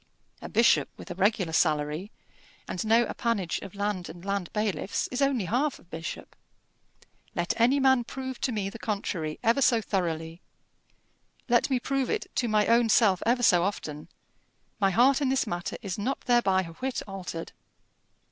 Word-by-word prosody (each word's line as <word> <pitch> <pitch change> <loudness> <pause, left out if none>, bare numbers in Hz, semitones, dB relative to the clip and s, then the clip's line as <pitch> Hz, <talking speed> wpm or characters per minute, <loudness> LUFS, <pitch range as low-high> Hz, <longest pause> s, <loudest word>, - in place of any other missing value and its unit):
A - - -7
bishop - - +4
with - - -9
a - - -2
regular 195 -5 +1
salary, 155 +3 +1 0.6
and 185 - -3
no 230 +2 +5
appanage 210 -7 -1
of 195 0 -10
land 200 -3 -2
and 175 +2 -11
land 200 -3 -2
bailiffs, 205 -5 -1
is 255 +2 -2
only 270 -7 +2
half 260 - 0
a - - -19
bishop. 165 -1 -7 1.0
Let 175 0 0
any 260 +4 +4
man 265 -3 +4
prove 260 0 -6
to 260 - 0
me 210 -4 -2
the 230 - -10
contrary 180 -8 -3
ever 230 +5 +3
so 240 -3 +4
thoroughly 165 -5 -3 1.1
let 240 +1 +3
me 260 -2 +1
prove 270 +1 -1
it 435 -3 -1
to 245 - +1
my 215 -1 +3
own 230 0 +4
self 205 -5 +4
ever 245 +1 +2
so 180 -6 +5
often 155 -6 -4 0.7
my 195 -2 +3
heart 255 +8 +4
in 275 - +2
this 265 0 +1
matter 175 -5 -4
is 195 0 -4
not 260 +7 -2
thereby 195 -6 +3
a 165 -2 -9
whit 260 -1 -2
altered. 180 -4 -6
210 Hz, 170 wpm, -27 LUFS, 175-245 Hz, 1.1 s, no